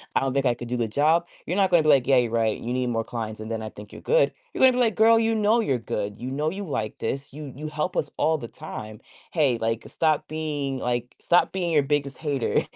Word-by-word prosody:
I - - +5
don't 135 -1 -1
think 140 0 +1
I 125 - +4
could 120 0 -8
do 125 +1 -2
the 115 -2 0
job." 155 +8 +3 0.2
You're 180 - -1
not 190 -2 +3
gonna 175 -2 +6
be, 155 - +2
like, 135 -4 +5
"Yeah, 135 0 +4
you're 120 -2 +2
right. 115 -2 +1
You 120 - -5
need 125 -1 0
more 115 -1 -1
clients, 110 -2 -5
and 110 0 -7
then 115 -1 -3
I 110 - -5
think 105 0 -12
you're - - -10
good." - - +3 0.2
You're - - -4
gonna 260 -1 +7
be, - - -2
like, 225 -5 +2
"Girl, 225 +2 +6
you 225 0 +2
know 215 +2 +3
you're 135 - 0
good. 105 -2 -4
You 125 - -4
know 150 +3 0
you 200 +1 -5
like 110 -8 -3
this. 135 +4 -4
You 145 -2 -7
you 150 +2 -6
help 150 +4 -3
us 145 - 0
all 160 0 +2
the 120 -5 -7
time. 110 0 -8 0.3
Hey, 145 -8 +2
like, 115 0 -2
stop 155 -2 0
being, 145 -3 -3
like, 120 0 -2
stop 175 +1 +3
being 180 -3 -1
your 150 -3 +4
biggest 140 -1 -1
hater." 145 -6 0
140 Hz, 270 wpm, -25 LUFS, 115-160 Hz, 0.3 s, gonna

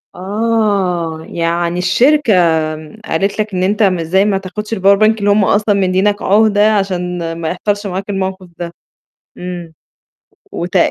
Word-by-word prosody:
آه، 195 -5 -1
يعني 170 +1 -1
الشركة 255 +7 +3 0.7
قالت 195 +5 -1
لك 210 -2 -2
إن 180 - 0
أنت 205 +3 +1
ما 185 -4 +2
إزاي 190 +5 +2
ما 205 -2 +1
تاخدش 210 +3 -6
الpower 195 0 +4
bank 220 +1 +3
اللي 205 - +1
هُم 205 0 +4
أصلًا 205 +1 +2
مدّيّينك 195 +2 +1
عُهدة، 210 +1 +3
عشان 180 -3 -2
ما 160 - -2
يحصلش 205 +3 -2
معاك 190 +2 -5
الموقف 190 -1 -3
ده. 170 -1 -5 0.6
إمم، 175 -2 -7 0.8
وت 175 +2 -3
195 Hz, 145 wpm, -15 LUFS, 180-210 Hz, 0.8 s, الpower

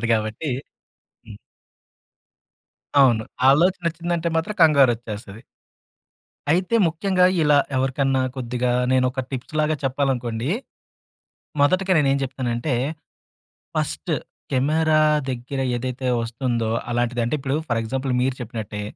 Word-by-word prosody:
బట్టుంటది 115 - -1
కాబట్టి 110 +7 -2 0.8
హ్మ్. 105 -2 -11 1.6
అవును. 120 -5 +4 0.3
ఆలోచనొచ్చిందంటే 170 +1 +1
మాత్రం, 165 +6 -1
కంగారొచ్చేస్తది. 120 -8 +2 1.1
అయితే, 180 +7 +1
ముఖ్యంగా 180 +3 +1 0.2
ఇలా 150 -1 +4 0.2
ఎవరికన్నా 135 0 +1
కొద్దిగా 125 -1 -2 0.2
నేనొక 130 0 +2
టిప్స్‌లాగా 155 +4 -1
చెప్పాలనుకోండి. 125 -3 -1 1.1
మొదటిక 185 +6 +2
నేనేం 140 -2 +3
చెప్తనంటే, 130 0 -2 1.0
ఫస్ట్ - - -2 0.4
కెమెరా 155 +4 +2 0.3
దగ్గర 130 +2 -4 0.2
ఏదైతే 130 +1 -4
వస్తుందో, 115 -1 -2 0.2
అలాంటిది. 120 0 0
అంటే, 120 - 0
ఇప్పుడు 135 +1 -1
ఫర్ 120 -1 +1
ఎగ్జాంపుల్ 130 +3 -2
మీరు 130 0 0
చెప్పినట్టే, 110 -3 -5
130 Hz, 95 wpm, -22 LUFS, 120-155 Hz, 1.6 s, అవును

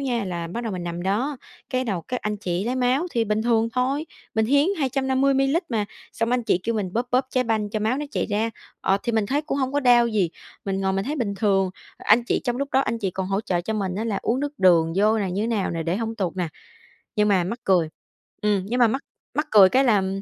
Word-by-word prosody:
nha, 245 -6 -1
là 175 -2 -4
bắt 230 +8 -5
đầu 220 - -2
mình 180 -1 -4
nằm 170 0 -4
đó, 240 +10 0 0.3
cái 255 0 0
đầu 195 -7 -2
các 250 -1 -4
anh 210 0 -2
chị 185 -1 -2
lấy 245 - -1
máu 260 +6 +1
thì 230 -1 +1
bình 215 0 0
thường 230 -1 +2
thôi. 270 +5 0 0.3
Mình 220 0 +2
hiến 285 +4 +4
250 270 0 +1
mi-li-lít 270 +6 +2
mà. 215 -3 0 0.3
Xong 230 +1 -1
mấy - - +3
anh 245 - -2
chị 200 - +2
kêu 230 - -1
mình 195 -4 -2
bóp 240 +3 -1
bóp 255 +1 +2
trái 255 -1 +1
banh 215 -3 0
cho 215 - -2
máu 225 +5 +1
nó 295 - -2
chạy - - -1
ra, 215 +2 0 0.3
ờ, 195 - +2
thì 235 - -1
mình 220 -2 +1
thấy 285 +7 0
cũng 300 -2 -2
hông 260 -1 -1
có 285 - +1
đau 245 -3 +5
gì. 205 -7 +1 0.3
Mình 195 -1 -1
ngồi 190 0 +1
mình 195 0 -1
thấy 300 +4 -3
bình 210 -6 -1
thường. 195 -3 +2 0.3
Anh 230 +3 +3
chị - - 0
trong 245 -2 0
lúc 280 +1 -2
đó 265 - +4
anh 230 -4 -1
chị 200 -4 -1
còn 190 +1 -3
hỗ 195 +1 0
trợ 185 -6 -1
cho 200 +6 -3
mình 195 -4 -2
á 215 +4 -2
là 215 -4 -1
uống 245 +3 0
nước 290 0 -4
đường 170 -3 +4
vô 215 +2 +3
này 190 -3 -1
như 200 - -1
thế - - 0
nào 220 -4 0
nè, 165 -1 -2
để 170 +3 -1
hông 225 +1 -3
tụt 190 -5 -3
nè. 180 -3 -1 0.7
Nhưng 210 0 +3
mà 190 -3 +3
mắc 230 +8 -4
cười 180 -6 +3 0.5
ừm, 205 -3 +1
nhưng 240 +5 -1
mà 240 - +6
mắc 265 +5 -1 0.3
mắc 300 +4 -1
cười 200 -3 +8
cái 265 +7 +3
là, 230 -6 +4
ừm, 190 0 -2
220 Hz, 275 wpm, -24 LUFS, 195-255 Hz, 0.7 s, cười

